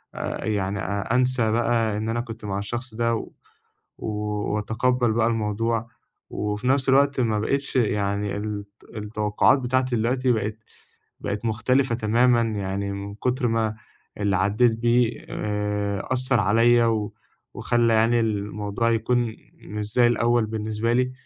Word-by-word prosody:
آآ -, -, -4 dB
يعني، 100 Hz, -2 st, -1 dB
آآ 100 Hz, +4 st, -2 dB
أنسى 125 Hz, -3 st, +2 dB
بقى 115 Hz, -2 st, +1 dB
إن 110 Hz, +1 st, -2 dB
أنا 120 Hz, +1 st, 0 dB
كنت 115 Hz, -2 st, -9 dB
مع 100 Hz, -1 st, -2 dB
الشخص 120 Hz, +3 st, -5 dB
ده، 115 Hz, 0 st, +1 dB
و -, -, -6 dB, 0.7 s
وأتقبل 105 Hz, +3 st, -1 dB
بقى 115 Hz, 0 st, +2 dB
الموضوع، 115 Hz, +1 st, -1 dB, 0.4 s
وفي 105 Hz, +3 st, -2 dB
نفْس 135 Hz, 0 st, +2 dB
الوقت 140 Hz, 0 st, +3 dB
ما 110 Hz, -3 st, +1 dB
بقيتش 140 Hz, +5 st, -1 dB
يعني، 100 Hz, -3 st, 0 dB
الت 105 Hz, 0 st, -6 dB
التوقعات 105 Hz, +4 st, +2 dB
بتاعتي 130 Hz, 0 st, 0 dB
دلوقتي 125 Hz, +3 st, +1 dB
بقت 110 Hz, -1 st, -2 dB, 0.6 s
بقت 105 Hz, +3 st, -3 dB
مختلفة 120 Hz, +3 st, +1 dB
تمامًا، 120 Hz, +2 st, +3 dB
يعني 100 Hz, -3 st, -2 dB
من 100 Hz, 0 st, -6 dB
كثر 125 Hz, +3 st, 0 dB
ما 110 Hz, -1 st, 0 dB, 0.4 s
اللي 100 Hz, -2 st, +1 dB
عديت 105 Hz, +5 st, +3 dB
بيه 120 Hz, 0 st, +1 dB
آآ 105 Hz, -1 st, -2 dB
أثّر 130 Hz, -1 st, +2 dB
عليّا، 115 Hz, +4 st, +4 dB
و 110 Hz, -2 st, 0 dB, 0.4 s
وخلى 120 Hz, -1 st, +2 dB
يعني 115 Hz, +2 st, +3 dB
الموضوع 105 Hz, 0 st, -1 dB
يكون 115 Hz, 0 st, 0 dB, 0.2 s
مش 105 Hz, 0 st, -6 dB
زي 120 Hz, -1 st, +5 dB
الأول 120 Hz, 0 st, +2 dB
بالنسبة 110 Hz, +1 st, -2 dB
لي، 125 Hz, +1 st, +1 dB
110 Hz, 140 wpm, -24 LUFS, 105-120 Hz, 0.7 s, زي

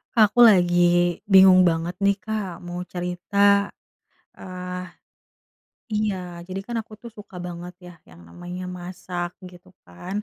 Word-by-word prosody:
Aku 215 Hz, +1 st, +4 dB
lagi 175 Hz, -3 st, +4 dB
bingung 190 Hz, -2 st, +7 dB
banget 170 Hz, +1 st, -1 dB
nih 200 Hz, 0 st, +2 dB
Kak, 200 Hz, -6 st, -5 dB
mau 175 Hz, 0 st, -6 dB
cerita. 200 Hz, +3 st, +1 dB, 0.7 s
Ah 180 Hz, 0 st, -7 dB, 1.1 s
iya, 190 Hz, -5 st, -2 dB
jadi 190 Hz, +1 st, -5 dB
kan 240 Hz, -, -4 dB
aku 220 Hz, -, -14 dB
tuh 235 Hz, -, -9 dB
suka 210 Hz, -4 st, -13 dB
banget 175 Hz, +1 st, -8 dB
ya, 175 Hz, -, -11 dB, 0.2 s
yang 85 Hz, +1 st, -16 dB
namanya 175 Hz, -, -8 dB
masak 175 Hz, 0 st, -6 dB
gitu 180 Hz, 0 st, -14 dB, 0.2 s
kan, 180 Hz, -, -6 dB
180 Hz, 130 wpm, -23 LUFS, 175-200 Hz, 1.1 s, bingung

